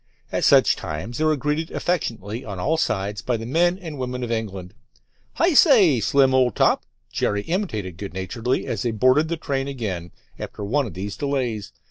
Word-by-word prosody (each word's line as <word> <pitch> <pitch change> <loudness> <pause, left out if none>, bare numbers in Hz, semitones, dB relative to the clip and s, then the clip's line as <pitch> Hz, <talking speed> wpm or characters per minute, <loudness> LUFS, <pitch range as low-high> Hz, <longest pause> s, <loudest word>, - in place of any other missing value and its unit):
At - - -1
such - - +5
times 85 +10 -5
they 155 - +2
were 155 0 +3
greeted 150 +4 -1
affectionately 115 - -2
on 100 -3 -6
all 155 - +1
sides 105 -8 -1
by 125 -2 -1
the 115 - -6
men 175 +8 +2
and 160 -7 -8
women 125 0 -3
of 120 - -3
England. 100 -5 -4 0.6
"Hi 340 +1 +2
say, 215 - +6
Slim, 135 +4 +3
old 125 -4 +3
top," - - +2 0.2
Jerry 105 0 0
imitated 110 - -3
good 100 -2 -7
naturedly 115 +6 -2
as - - -3
they 120 - 0
boarded 130 +7 +3
the 170 +1 -2
train 135 -3 -2
again 100 -11 -4 0.3
after - - -6
one 130 +6 0
of - - -10
these 100 +2 -5
delays. 125 -7 -2
125 Hz, 185 wpm, -23 LUFS, 105-150 Hz, 0.6 s, say